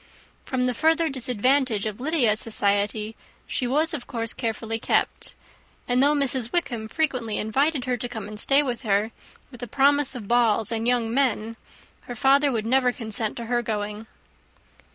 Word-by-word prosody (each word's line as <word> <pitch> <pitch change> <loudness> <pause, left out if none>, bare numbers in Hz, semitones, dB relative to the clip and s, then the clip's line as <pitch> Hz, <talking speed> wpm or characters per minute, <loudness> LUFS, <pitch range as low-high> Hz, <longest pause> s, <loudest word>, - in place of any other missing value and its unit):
From 255 -1 -1
the 250 - 0
further 320 +5 +2
disadvantage 255 -3 +1
of 215 0 -4
Lydia's 250 -7 +2
society 210 0 0 0.3
she 250 - -2
was 305 +6 +1
of 250 -6 -5
course 230 -2 -3
carefully 225 -1 -3
kept; - - -1 0.5
and 250 +1 +2
though 290 +2 +4
Mrs. 260 -4 +1
Wickham 240 -11 -1
frequently 250 -5 -1
invited 270 +6 0
her 250 -1 -1
to 245 +1 -5
come 220 -4 -6
and 210 0 -5
stay 275 +6 +4
with 250 -3 -3
her, 210 -1 0 0.4
with 245 - -12
the 245 - -5
promise 280 +2 +2
of 220 -5 -7
balls 225 -2 +2
and 225 0 -2
young 235 -2 +1
men, 230 -4 0 0.5
her 245 - -5
father 275 +4 +3
would 220 -3 -2
never 250 +1 +3
consent 220 -2 -2
to 235 - -5
her 240 +1 0
going. 210 -1 -4
240 Hz, 170 wpm, -24 LUFS, 220-270 Hz, 0.5 s, though